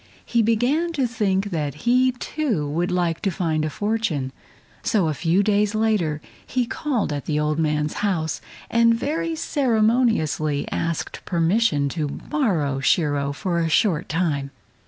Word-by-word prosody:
He 235 Hz, -, +2 dB
began 245 Hz, +10 st, +1 dB
to 275 Hz, -5 st, +1 dB
think 205 Hz, -4 st, 0 dB
that 150 Hz, -, -3 dB
he, 255 Hz, +2 st, +4 dB
too, 245 Hz, -, -2 dB
would 170 Hz, +5 st, -1 dB
like 175 Hz, -2 st, 0 dB
to 195 Hz, -, +1 dB
find 165 Hz, -4 st, -1 dB
a 155 Hz, -, 0 dB
fortune. 205 Hz, -8 st, -1 dB, 0.5 s
So 200 Hz, -7 st, +1 dB
a 155 Hz, -, 0 dB
few 170 Hz, +6 st, +2 dB
days 210 Hz, 0 st, +2 dB
later 205 Hz, -9 st, +1 dB, 0.2 s
he 250 Hz, -1 st, -1 dB
called 240 Hz, -, -1 dB
at 145 Hz, -2 st, -4 dB
the 150 Hz, -1 st, 0 dB
old 150 Hz, +1 st, 0 dB
man's 150 Hz, -1 st, 0 dB
house 165 Hz, -7 st, -1 dB, 0.3 s
and 230 Hz, 0 st, +4 dB
very 320 Hz, +6 st, -2 dB
ceremoniously 220 Hz, -, +1 dB
asked 165 Hz, -1 st, -3 dB
permission 170 Hz, -3 st, +2 dB
to 155 Hz, 0 st, -2 dB
borrow 160 Hz, -, -1 dB
Shiro 145 Hz, 0 st, +1 dB
for 170 Hz, +4 st, -2 dB
a 165 Hz, -1 st, 0 dB
short 165 Hz, -1 st, +2 dB
time. 155 Hz, -5 st, 0 dB
180 Hz, 150 wpm, -23 LUFS, 155-230 Hz, 0.5 s, he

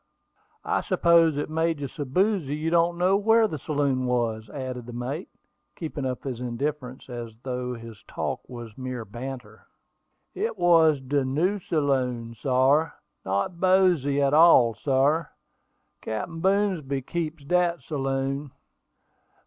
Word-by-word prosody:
"I -, -, +1 dB
suppose 170 Hz, -4 st, +3 dB
it 145 Hz, -, -2 dB
made 160 Hz, 0 st, 0 dB
you 140 Hz, -, -3 dB
so 145 Hz, +2 st, -6 dB
boozy 180 Hz, 0 st, +1 dB
you 155 Hz, +2 st, -2 dB
don't 170 Hz, 0 st, +2 dB
know 185 Hz, +2 st, +3 dB
where 220 Hz, +2 st, +4 dB
the 155 Hz, -7 st, -5 dB
saloon 140 Hz, -3 st, 0 dB
was," 115 Hz, -3 st, -1 dB
added 125 Hz, -1 st, -6 dB
the 120 Hz, -, -8 dB
mate, 130 Hz, +9 st, -4 dB, 0.5 s
keeping 155 Hz, -5 st, -4 dB
up 125 Hz, -1 st, -4 dB
his 130 Hz, -4 st, -4 dB
indifference, 130 Hz, +1 st, -4 dB
as 120 Hz, -3 st, -7 dB
though 125 Hz, -1 st, -3 dB
his 115 Hz, -2 st, -11 dB
talk -, -, -3 dB
was 120 Hz, -3 st, -9 dB
mere 130 Hz, -3 st, -5 dB
banter. 120 Hz, 0 st, -8 dB, 0.7 s
"It 405 Hz, -, -3 dB
was 165 Hz, -4 st, +5 dB
de 140 Hz, +1 st, 0 dB
new 165 Hz, +10 st, 0 dB
saloon, 130 Hz, -8 st, -1 dB
sar; 140 Hz, +4 st, +2 dB, 0.3 s
not 100 Hz, -, -1 dB
boozy 180 Hz, -7 st, +3 dB
at 140 Hz, 0 st, +2 dB
all, 150 Hz, -7 st, +7 dB
sar; 140 Hz, +7 st, +1 dB, 0.7 s
Captain 135 Hz, +10 st, -4 dB
Boomsby 180 Hz, -8 st, 0 dB
keeps 160 Hz, 0 st, -4 dB
dat 175 Hz, +2 st, +1 dB
saloon. 135 Hz, 0 st, -2 dB
140 Hz, 135 wpm, -26 LUFS, 125-165 Hz, 0.7 s, all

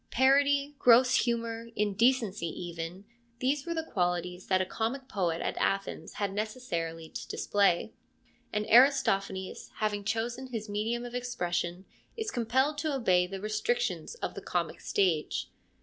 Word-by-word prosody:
Parody, 280 Hz, +2 st, +3 dB
gross 250 Hz, +1 st, +6 dB
humour, 230 Hz, -1 st, 0 dB
indecency 210 Hz, -2 st, +2 dB
even, 170 Hz, +3 st, -6 dB, 0.3 s
these 270 Hz, +4 st, 0 dB
were 335 Hz, -, -1 dB
the 320 Hz, -, -1 dB
qualities 180 Hz, -, -2 dB
that 185 Hz, -1 st, +3 dB
a 185 Hz, -, +1 dB
comic 240 Hz, +7 st, -3 dB
poet 175 Hz, -7 st, -1 dB
at -, -, -2 dB
Athens 195 Hz, 0 st, -1 dB
had 200 Hz, -2 st, -2 dB
neces 215 Hz, +5 st, -4 dB
sarily 165 Hz, -1 st, -3 dB
to -, -, -6 dB
display, 200 Hz, -4 st, +1 dB, 0.6 s
and 210 Hz, 0 st, -1 dB
Aristophanes, 210 Hz, -6 st, +3 dB
having 210 Hz, -1 st, -1 dB
chosen 235 Hz, +4 st, -2 dB
his 225 Hz, -4 st, -5 dB
medium 220 Hz, +4 st, -2 dB
of 240 Hz, -, -8 dB
expression, 180 Hz, -7 st, -2 dB, 0.3 s
is 440 Hz, -2 st, -2 dB
compelled 260 Hz, +5 st, +1 dB
to 310 Hz, 0 st, -1 dB
obey 180 Hz, -8 st, +3 dB
the 195 Hz, +1 st, -6 dB
restrictions 475 Hz, -, -1 dB
of -, -, -4 dB
the -, -, -7 dB
comic -, -, -2 dB
stage. 175 Hz, -6 st, 0 dB
215 Hz, 145 wpm, -30 LUFS, 185-255 Hz, 0.6 s, gross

